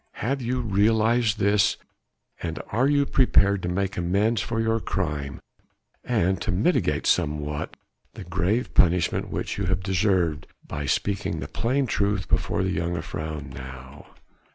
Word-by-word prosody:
Have 135 +4 -2
you 125 +1 -1
realized 110 +1 +2
this, 100 +1 +3 0.6
and 80 -1 -4
are 125 +5 +2
you 145 0 +3
prepared 100 -8 +3
to 90 - -2
make 95 +2 -1
amends 100 +5 +1
for 115 -1 -2
your 115 0 +1
crime 75 -9 -3 0.6
and 95 -6 +1
to - - -1
mitigate 105 - +1
somewhat 75 0 0 0.4
the - - -7
grave 105 +9 -1
punishment 90 0 +2
which - - -3
you 100 - -1
have 95 +1 0
deserved 95 -5 +1 0.2
by 70 -1 -4
speaking 100 +6 -1
the - - -5
plain 130 +4 0
truth 100 -4 0
before - - 0
the 95 0 -1
jongejuffrouw 80 -4 -4
now?" 65 +1 -10
95 Hz, 140 wpm, -25 LUFS, 85-110 Hz, 0.6 s, this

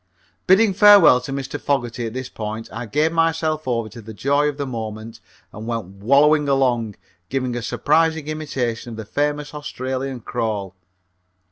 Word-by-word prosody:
Bidding 195 +2 +5
farewell 200 -10 +7
to 125 - -7
Mr. 135 +1 -4
Fogerty 120 -4 -1
at 110 - -7
this 130 -1 -4
point, 110 +1 -6
I 115 +1 -5
gave 150 +8 +1
myself 160 -2 0
over 115 -3 -1
to 115 +3 -11
the 110 0 -10
joy 140 +6 +2
of 145 - -6
the 140 - -2
moment 110 -2 -6 0.3
and 110 +2 -8
went 115 -4 -2
wallowing 140 - +3
along, 120 -6 +1 0.3
giving 130 -2 -2
a 120 - -3
surprising 160 +5 +1
imitation 135 -7 -3
of - - -9
the 110 - -6
famous 145 +5 -2
Australian 130 -3 -4
crawl. 105 -5 -3
130 Hz, 160 wpm, -21 LUFS, 115-150 Hz, 0.3 s, farewell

